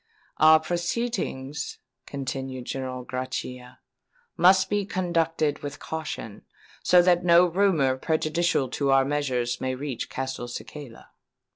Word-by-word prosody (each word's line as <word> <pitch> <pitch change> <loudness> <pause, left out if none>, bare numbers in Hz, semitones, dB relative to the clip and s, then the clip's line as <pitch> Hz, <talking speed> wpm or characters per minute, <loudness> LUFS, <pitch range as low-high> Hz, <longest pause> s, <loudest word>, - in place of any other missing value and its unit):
"Our 155 0 +7
proceedings," 170 - -3 0.3
continued 130 -2 -5
General 130 -1 -5
Grachia, 130 0 -5 0.6
"must 185 +2 +5
be 205 +1 0
conducted 165 -6 0
with 145 0 -6
caution, 155 -9 -6 0.4
so 180 -1 +5
that 175 0 +3
no 175 0 +6
rumour 170 -8 +2
prejudicial 155 0 0
to 140 +2 -1
our 135 0 +5
measures 130 -4 -1
may 130 0 -1
reach 135 -2 -5
Castelcicala." 130 0 -7
145 Hz, 110 wpm, -26 LUFS, 130-170 Hz, 0.6 s, Our